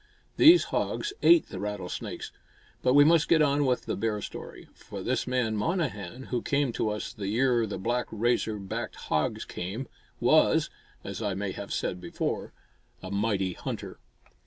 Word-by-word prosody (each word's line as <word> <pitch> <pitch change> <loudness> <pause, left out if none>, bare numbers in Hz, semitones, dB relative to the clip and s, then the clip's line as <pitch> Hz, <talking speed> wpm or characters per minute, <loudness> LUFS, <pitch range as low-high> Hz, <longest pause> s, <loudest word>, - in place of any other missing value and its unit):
These 340 +2 +8
hogs 415 - -1
ate 340 -2 +6
the - - -6
rattlesnakes. 100 -3 -5 0.5
But 125 +1 +3
we 145 - +9
must 165 +1 +4
get 160 -2 +5
on 145 0 +2
with 125 -1 0
the - - -2
bear 110 -2 -1
story; - - -8
for - - -9
this - - -1
man 125 -3 0
Monnehan, 125 - -2
who 120 -2 0
came 140 -2 +1
to 110 - 0
us 105 0 -4
the 100 -2 -5
year 120 +1 +2
the 105 - -4
black, 120 +4 -1
razor 110 -1 0
backed 100 -1 -5
hogs 75 -1 -1
came, 100 +9 -5 0.3
was, - - +4 0.3
as - - -6
I 100 -3 -1
may 100 0 -2
have 100 +1 -7
said 90 - -2
before, 85 -1 -3 0.5
"a 95 - -6
mighty 100 -2 0
hunter." - - -6
115 Hz, 165 wpm, -28 LUFS, 100-135 Hz, 0.5 s, we